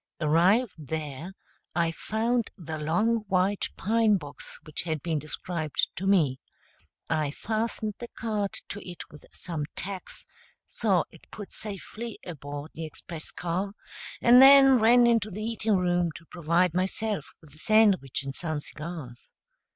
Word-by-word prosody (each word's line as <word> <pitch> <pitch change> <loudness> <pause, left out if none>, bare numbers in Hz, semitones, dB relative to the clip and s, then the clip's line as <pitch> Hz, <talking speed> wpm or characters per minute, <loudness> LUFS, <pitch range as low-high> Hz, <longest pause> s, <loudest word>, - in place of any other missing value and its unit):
Arrived 180 +9 +3
there 155 +2 -4 0.4
I 170 -1 +2
found 225 +6 -1
the 160 -4 -6
long 180 +10 +2
white 195 +1 +1
pine 220 -1 +3
box 145 -5 -10
which 155 - -3
had 160 -4 -3
been 160 -3 0
described 155 0 -2
to 195 - -3
me; 155 -10 +3 0.7
I 155 -3 0
fastened 220 +5 -2
the 240 - -6
card 215 -4 -2 0.2
to 205 - -5
it 175 -2 -8
with 150 - -14
some 160 -4 -4
tacks, 190 0 -4 0.4
saw - - +1
it - - -18
put 205 - -9
safely 215 +2 -6
aboard 145 -2 -7
the 160 - -5
express 160 +1 -7
car, 180 +3 -3 0.5
and 245 +2 +8
then 270 -1 +9
ran 240 +2 +6
into 230 -3 +3
the 210 +2 -6
eating 220 -2 +1
room 175 -1 +1
to 165 - -11
provide 170 0 +2
myself 190 0 -1
with 155 -4 -18
a 155 - -16
sandwich 200 - +3
and 135 0 -5
some 155 0 -3
cigars. 150 -5 -8
180 Hz, 145 wpm, -27 LUFS, 155-215 Hz, 0.7 s, then